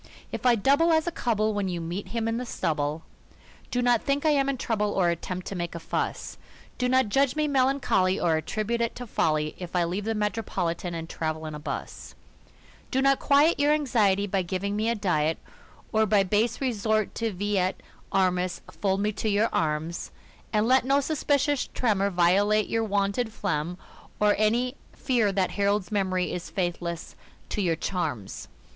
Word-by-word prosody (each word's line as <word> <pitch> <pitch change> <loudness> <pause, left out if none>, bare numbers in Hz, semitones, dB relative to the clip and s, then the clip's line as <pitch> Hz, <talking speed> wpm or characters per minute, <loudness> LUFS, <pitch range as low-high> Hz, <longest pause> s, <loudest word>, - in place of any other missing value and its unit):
If 255 - -1
I 240 - +6
double 280 - +3
as 315 -1 +3
a 345 - -1
cub'll 220 -7 0
when 205 -2 -1
you 175 -2 -2
meet 175 +4 -4
him 225 +3 -2
in 225 0 0
the 250 - -3
stubble, 150 -4 -2 0.7
Do 245 0 0
not 245 -2 +3
think 285 +2 -1
I 310 - +5
am 275 -2 +2
in 275 - -1
trouble 210 -4 -1
or 175 -3 +2
at 170 - -4
tempt 185 0 -5
to 195 - -5
make 175 -1 -4
a - - -4
fuss; - - -3 0.4
Do 250 0 +1
not 260 -3 +3
judge 270 +4 +2
me 305 0 +1
melancholy 260 -9 +2
or 165 -2 +2
at 160 - -5
tribute 225 +2 -1
it 230 - -1
to 245 - -6
folly 155 -7 0
If 180 -1 -7
I 175 - +3
leave 185 +4 -2
the 225 0 -1
Metropolitan 190 -5 -2
and 165 0 -5
travel 155 -1 -3
'n 155 - -5
a 150 - -6
bus 150 - -6 0.7
Do 265 - 0
not 275 0 +3
quiet 290 +4 +4
your 290 +1 +4
anxiety 215 -10 +2
by 195 -1 0
giving 190 +3 -2
me 215 +2 0
a 235 - +1
diet, 165 -6 +1 0.5
Or 220 -1 +3
by 205 -1 +4
base 215 +5 +1
resort 220 -4 0
to 230 -1 -2
vi 205 +1 -1
et 185 +1 +1 0.4
armis 185 -1 +1
fold 195 -1 -1
me 210 +1 +1
to 215 +1 -2
your 210 +2 +2
arms, 155 +2 -1 0.4
And 215 0 +2
let 260 0 +5
no 275 +2 +3
suspicious 285 -1 +1
tremor 200 -5 +2
violate 200 +4 +3
your 225 0 +1
wonted 205 +2 0
phlegm 180 -5 -2 0.4
or 210 0 +4
Any 240 +5 +1 0.2
fear 235 -6 +1
that 195 -1 0
Harold's 200 0 0
memory 185 -3 0
is 180 - -5
faithless 175 -2 -3 0.3
to 210 - -2
your 170 -4 +1
charms. 155 - -4
205 Hz, 190 wpm, -26 LUFS, 180-240 Hz, 0.7 s, I